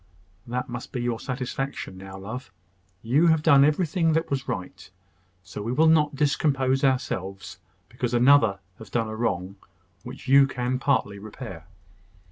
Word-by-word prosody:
"That 125 +1 -3
must 120 +1 -7
be 125 - -4
your 120 -2 -1
satisfaction 130 -3 -4
now, 95 0 -10
love. 110 +7 -7 0.5
You 140 +9 +3
have 160 -2 +3
done 140 -2 +6
everything 160 +2 +2
that 160 0 -1
was 135 -1 -2
right; 95 -6 -6 0.5
so 90 +3 -8
we 115 +3 -3
will 155 +6 +3
not 150 -2 +3
discompose 135 -2 +1
ourselves 95 -8 -2 0.3
because 120 0 -3
another 120 -5 +5 0.2
has 110 -3 -11
done 115 +1 -1
a 110 - -5
wrong 100 -4 -2 0.4
which 130 +2 -10
you 135 +1 +6
can 125 -1 -2
partly 115 -8 0
repair." 100 -5 -9
125 Hz, 150 wpm, -25 LUFS, 105-140 Hz, 0.5 s, done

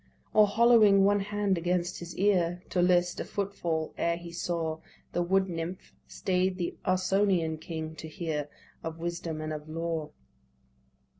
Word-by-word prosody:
Or 215 -1 +6
hollowing 215 -2 +6
one 205 +1 +4
hand 200 -2 0
against 175 +1 -1
his 175 0 -8
ear, 180 -3 +2
To 180 - +2
list 175 0 +3
a - - -1
foot 200 0 -3
fall, 160 -4 -2
ere 170 0 +1
he 170 0 -9
saw 165 -2 -2 0.3
The 175 - +1
wood 190 +2 +2
nymph, 170 +1 -5
stay'd 185 -1 0
the 175 -2 -2
Ausonian 185 -3 +2
king 160 -1 -5
to 160 - -7
hear 155 -3 -3 0.3
Of 165 0 -5
wisdom 170 -2 -4
and 155 0 -3
of 150 0 -7
law. 165 -1 -3
175 Hz, 155 wpm, -29 LUFS, 165-190 Hz, 0.3 s, Or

